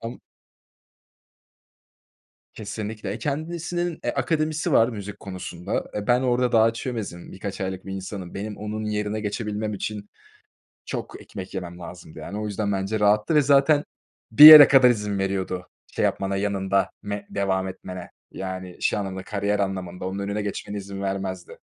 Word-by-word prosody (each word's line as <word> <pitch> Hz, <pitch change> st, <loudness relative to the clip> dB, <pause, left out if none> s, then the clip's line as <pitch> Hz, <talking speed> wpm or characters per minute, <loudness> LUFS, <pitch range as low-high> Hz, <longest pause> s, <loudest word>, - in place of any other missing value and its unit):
Ama 115 Hz, +2 st, -7 dB, 2.4 s
Kesinlikle, 105 Hz, -1 st, -6 dB
eee, 110 Hz, -, -4 dB
kendisinin, 170 Hz, +5 st, -3 dB
eee, -, -, 0 dB
akademisi 155 Hz, +1 st, 0 dB
var 115 Hz, -2 st, +5 dB
müzik 105 Hz, -3 st, -7 dB
konusunda. 90 Hz, -1 st, -5 dB
E, 105 Hz, -, -3 dB
ben 125 Hz, +1 st, +4 dB
orada 125 Hz, -1 st, +1 dB
daha 115 Hz, 0 st, +5 dB
çömezim 115 Hz, -7 st, -6 dB
birkaç 95 Hz, +1 st, -6 dB
aylık 95 Hz, 0 st, -4 dB
bir 95 Hz, -, -5 dB
insanım. 95 Hz, -1 st, -6 dB
Benim 105 Hz, +1 st, -5 dB
onun 105 Hz, +1 st, -5 dB
yerine 105 Hz, 0 st, -2 dB
geçebilmem 105 Hz, 0 st, -3 dB
için 105 Hz, +1 st, -5 dB, 0.8 s
çok -, -, -6 dB
ekmek 95 Hz, +1 st, -9 dB
yemem 90 Hz, -2 st, -6 dB
lazımdı 85 Hz, -2 st, -10 dB
yani 100 Hz, +7 st, -6 dB
o 105 Hz, -, -3 dB
yüzden 100 Hz, 0 st, -2 dB
bence 100 Hz, +3 st, -2 dB
rahattı 105 Hz, +8 st, +3 dB
ve 150 Hz, -, +6 dB
zaten 145 Hz, +2 st, +4 dB, 0.5 s
bir 115 Hz, +7 st, +8 dB
yere 155 Hz, -2 st, +13 dB
kadar 130 Hz, -2 st, +7 dB
izin 105 Hz, -3 st, -1 dB
veriyordu 95 Hz, -2 st, -2 dB, 0.2 s
şey -, -, -1 dB
yapmana 100 Hz, 0 st, 0 dB
yanında 100 Hz, -1 st, 0 dB
me 100 Hz, 0 st, -5 dB
devam 95 Hz, -1 st, -1 dB
etmene 90 Hz, -1 st, -8 dB, 0.2 s
yani 95 Hz, -1 st, -7 dB
şey -, -, +1 dB
anlamında 95 Hz, -2 st, -4 dB
kariyer 100 Hz, +1 st, -1 dB
anlamında, 95 Hz, -2 st, -3 dB
onun 95 Hz, +1 st, -4 dB
önüne 100 Hz, +1 st, -2 dB
geçmene 105 Hz, 0 st, -5 dB
izin 100 Hz, 0 st, -7 dB
vermezdi. 95 Hz, -2 st, -4 dB
100 Hz, 150 wpm, -24 LUFS, 95-110 Hz, 2.4 s, yere